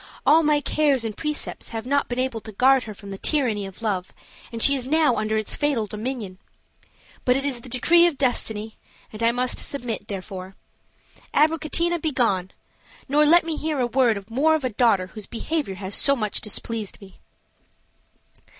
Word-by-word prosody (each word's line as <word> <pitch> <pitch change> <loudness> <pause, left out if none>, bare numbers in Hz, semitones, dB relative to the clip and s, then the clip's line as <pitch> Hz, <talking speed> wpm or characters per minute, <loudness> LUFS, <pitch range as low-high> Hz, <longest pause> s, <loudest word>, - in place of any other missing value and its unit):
All 320 +2 +6
my 300 -2 +2
cares 285 -5 +1
and 220 -2 -4
precepts 300 -1 -5
have 225 0 -5
not 280 +2 +1
been 245 - -3
able 255 -3 -1
to 220 - -9
guard 260 +5 +4
her 215 - -7
from 200 0 -10
the 195 - -7
tyranny 230 -10 0
of 195 +4 -12
love, 190 -4 -2 0.4
and 230 - -5
she 280 - +5
is 260 -2 -2
now 305 -3 +3
under 215 0 0
its 215 - -1
fatal 285 -7 0
dominion. 210 -2 -5 0.8
But 250 - +3
it 275 +1 -1
is 260 -4 -2
the 255 - -9
decree 340 +8 +5
of 320 -5 -2
destiny, 220 -5 -1 0.4
and 215 - -8
I 230 0 +4
must 250 +1 -1
submit; 240 -6 -3
therefore, 190 -1 -7 0.8
Abricotina, 325 +3 +2
begone! 230 - 0 0.6
nor 295 +2 +4
let 345 +3 +6
me 325 -1 -2
hear 310 -2 -2
a 250 - +2
word 235 -5 +1
more 285 +8 +2
of 310 - -2
a - - +1
daughter 215 -4 +3
whose 205 +2 -10
behavior 275 -3 -3
has 190 +1 -7
so 280 0 +3
much 215 -5 -2
displeased 215 0 -5
me." 195 -2 -15
245 Hz, 180 wpm, -24 LUFS, 215-285 Hz, 0.8 s, All